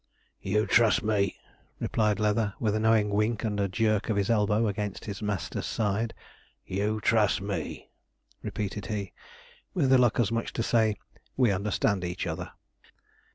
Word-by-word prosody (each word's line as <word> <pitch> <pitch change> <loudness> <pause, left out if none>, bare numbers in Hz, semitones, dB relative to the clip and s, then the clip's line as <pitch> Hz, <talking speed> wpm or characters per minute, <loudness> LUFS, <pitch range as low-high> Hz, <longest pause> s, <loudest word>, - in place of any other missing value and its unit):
'You 105 +3 +1
trust 110 -5 +4
me,' 105 -3 +1 0.4
replied 105 -2 +1
Leather, 105 -1 +1
with 110 -3 +1
a 110 - 0
knowing 110 -2 +3
wink 105 +3 0
and 105 -2 -1
a 100 - +2
jerk 110 +2 0
of 105 - +1
his 100 +2 +1
elbow 105 0 +2
against 105 -1 -3
his 100 -1 -6
master's 105 -4 -3
side; 110 +2 -1 0.5
'you 105 +3 -1
trust 110 -1 +3
me,' 100 0 -5 0.5
repeated 105 -1 -4
he, 100 -3 -4 0.6
with 135 -7 +3
a 130 - +7
look 120 -1 +3
as 115 -4 +2
much 115 0 0
as - - -5
to 115 - -1
say, 110 -2 +2 0.4
'we 125 -5 +4
understand 100 0 0
each 90 0 -3
other.' - - -4
105 Hz, 160 wpm, -28 LUFS, 100-110 Hz, 0.6 s, a